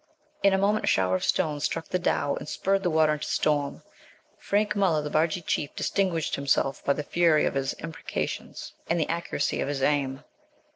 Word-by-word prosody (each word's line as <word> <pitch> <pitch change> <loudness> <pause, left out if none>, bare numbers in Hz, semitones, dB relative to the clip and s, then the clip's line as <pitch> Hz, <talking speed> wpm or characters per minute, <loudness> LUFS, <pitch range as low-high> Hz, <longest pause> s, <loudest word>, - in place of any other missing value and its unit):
In 200 - +5
a 190 - +3
moment 205 +2 +1
a - - -6
shower 95 -1 +2
of - - -2
stones 150 -5 0
struck 165 0 -3
the 180 - 0
dhow, 145 -4 0
and - - -6
spurred 195 0 0
the 180 - 0
water 155 -1 +3
into 150 0 -4
storm. 145 -2 0 0.6
Frank 205 0 0
Muller, 180 -7 +2
the 150 - -5
Barghî 160 +2 +1
chief, 145 - -2
distinguished 180 -5 0
himself 140 0 0
by 140 - +3
the 150 - -4
fury 165 0 +3
of - - 0
his 135 -1 -1
imprecations 160 0 -5 0.2
and 170 +1 +2
the 160 - 0
accuracy 170 +1 -1
of - - -1
his 140 -2 -2
aim. 135 -2 0
155 Hz, 195 wpm, -27 LUFS, 145-180 Hz, 0.6 s, In